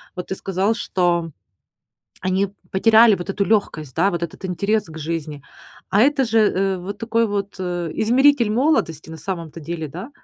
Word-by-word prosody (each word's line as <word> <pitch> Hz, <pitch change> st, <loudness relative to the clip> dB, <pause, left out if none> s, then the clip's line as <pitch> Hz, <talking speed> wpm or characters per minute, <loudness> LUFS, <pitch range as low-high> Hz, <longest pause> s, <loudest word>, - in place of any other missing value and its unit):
вот 180 Hz, -, -6 dB
ты -, -, 0 dB
сказал, 195 Hz, +4 st, -1 dB
что 175 Hz, -6 st, 0 dB, 0.9 s
они 185 Hz, +2 st, 0 dB, 0.2 s
потеряли 220 Hz, +2 st, +5 dB
вот 180 Hz, +2 st, -7 dB
эту 200 Hz, 0 st, 0 dB
легкость, 165 Hz, -, 0 dB
да, 190 Hz, +4 st, +3 dB
вот 170 Hz, -2 st, -4 dB
этот 170 Hz, +3 st, -6 dB
интерес 200 Hz, +4 st, 0 dB
к 160 Hz, 0 st, -12 dB
жизни, 155 Hz, -2 st, -4 dB, 0.5 s
а 200 Hz, -, +3 dB
это 275 Hz, 0 st, +3 dB
же, 225 Hz, -1 st, +1 dB
э, 195 Hz, -3 st, +2 dB
вот 195 Hz, +3 st, -7 dB
такой 230 Hz, +1 st, +1 dB
вот, 200 Hz, -1 st, -3 dB
э, 175 Hz, -3 st, -3 dB
измеритель 250 Hz, +1 st, +3 dB
молодости, 215 Hz, -, 0 dB
на 160 Hz, -, -7 dB
самом-то 170 Hz, -2 st, -5 dB
деле, 160 Hz, 0 st, -5 dB
да? 180 Hz, -, -8 dB
190 Hz, 170 wpm, -21 LUFS, 170-220 Hz, 0.9 s, потеряли